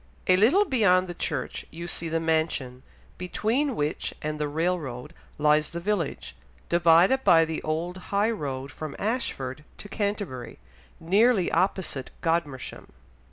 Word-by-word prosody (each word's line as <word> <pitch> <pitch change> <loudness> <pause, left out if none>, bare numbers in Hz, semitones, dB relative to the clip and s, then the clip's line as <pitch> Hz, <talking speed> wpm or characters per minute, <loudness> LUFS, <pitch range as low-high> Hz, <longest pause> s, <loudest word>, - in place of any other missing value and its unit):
A 185 - +5
little 260 - +5
beyond 200 - +3
the 175 - -5
church - - -3
you 170 +2 -7
see 170 -1 -3
the 165 +1 0
mansion, 155 -6 -1 0.4
between 230 +9 0
which 150 -2 -2
and 155 0 -3
the 150 - 0
railroad 150 -3 -2 0.2
lies 150 0 +3
the 170 - -5
village, 175 - -2 0.3
divided 170 +9 +5
by 165 -4 +6
the 160 0 -4
old 165 +4 -2
high 205 +3 +2
road 135 -8 -4
from 155 +1 -7
Ashford 150 - -3
to - - -10
Canterbury, 200 - -3 0.4
nearly 200 +3 +3
opposite 185 -8 -1
Godmersham. 165 -6 -2
170 Hz, 135 wpm, -26 LUFS, 150-200 Hz, 0.4 s, by